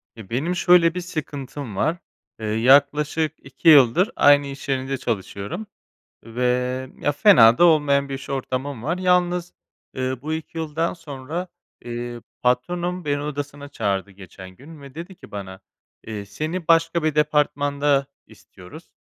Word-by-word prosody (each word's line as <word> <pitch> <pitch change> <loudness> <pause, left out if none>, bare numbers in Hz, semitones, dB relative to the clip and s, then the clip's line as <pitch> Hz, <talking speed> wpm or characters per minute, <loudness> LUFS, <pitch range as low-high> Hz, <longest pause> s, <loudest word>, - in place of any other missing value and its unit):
Eee, 110 -4 -12
benim 155 +10 -1
şöyle 175 -1 +5
bir 180 - -4
sıkıntım 145 - -6
var: 160 - 0 0.4
Eee, 110 - -5
yaklaşık 140 +7 +3
2 135 +5 0
yıldır 150 - +6
aynı 145 0 +5
iş 140 0 -9
yerinde 135 0 -1
çalışıyorum, 105 - -4 0.6
ve, 115 +2 -5 0.6
ya, 145 - +1
fena 130 - +6
da - - +6
olmayan 145 -4 +3
bir 135 - -4
iş 135 - -8
ortamım 130 -1 -3
var. 165 +7 -2
Yalnız, 180 -1 +1 0.4
eee, 130 0 -2
bu 155 +2 -4
2 160 +1 -5
yıldan 160 +1 -2
sonra, 160 +2 -6 0.4
eee, 120 0 -6 0.2
patronum 175 +8 -1
beni 145 -1 -1
odasına 145 -1 -6
çağırdı 100 -7 -2
geçen 95 -1 -12
gün 145 - -14
ve 140 -2 -12
dedi 170 +4 -8
ki - - -16
bana: 95 -2 -8 0.5
"Eee, 105 -2 -5
seni 155 - -5
başka 165 0 +3
bir 155 -1 0
departmanda 145 -2 +1 0.2
istiyoruz. - - -15
145 Hz, 145 wpm, -22 LUFS, 125-165 Hz, 0.6 s, yıldır